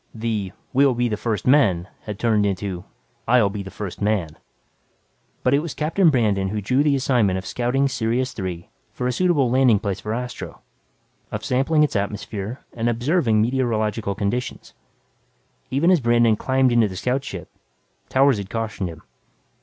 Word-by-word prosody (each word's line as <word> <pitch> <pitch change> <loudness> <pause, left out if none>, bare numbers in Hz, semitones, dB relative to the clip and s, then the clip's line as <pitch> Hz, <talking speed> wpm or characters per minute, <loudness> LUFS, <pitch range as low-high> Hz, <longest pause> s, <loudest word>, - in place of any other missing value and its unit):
The 110 -4 -2 0.2
"we'll 135 -1 +4
be 120 +1 +1
the 110 - -1
first 110 -1 -3
men" 100 -11 +3 0.2
had 105 -2 -5
turned 110 -2 +2
into, 95 -2 -2 0.4
"I'll 115 -4 +4
be 100 0 -4
the 95 - -8
first 100 -1 -7
man." 100 -7 0 1.1
But 125 - +3
it 140 - +4
was 155 -2 -5
Captain 165 +4 +3
Brandon 105 -8 +1
who 105 +2 -2
drew 125 +7 +1
the 145 -1 +3
assignment 120 -8 +2
of 95 - -6
scouting 125 +6 0
Sirius 125 +1 -1
Three 90 -4 -5 0.2
for 125 - -4
a 125 - +1
suitable 145 -4 +2
landing 130 -4 +4
place 100 -2 -3
for 105 +2 -3
Astro, 125 0 -6 0.7
of - - -4
sampling 135 +5 +2
its 150 - 0
atmosphere 105 +3 -3
and 120 0 -1
observing 120 -2 +2
meteorological 110 -4 -1
conditions. 110 +5 -3 1.0
Even 145 +8 +3
as 180 - +5
Brandon 120 -2 +3
climbed 130 +3 +2
into 120 -2 +4
the 95 - -8
scout 125 +7 -1
ship, 95 - -8 0.6
Towers 135 -4 +3
had 95 -1 -6
cautioned 110 -4 -3
him. 80 -1 -11
115 Hz, 165 wpm, -22 LUFS, 100-130 Hz, 1.1 s, as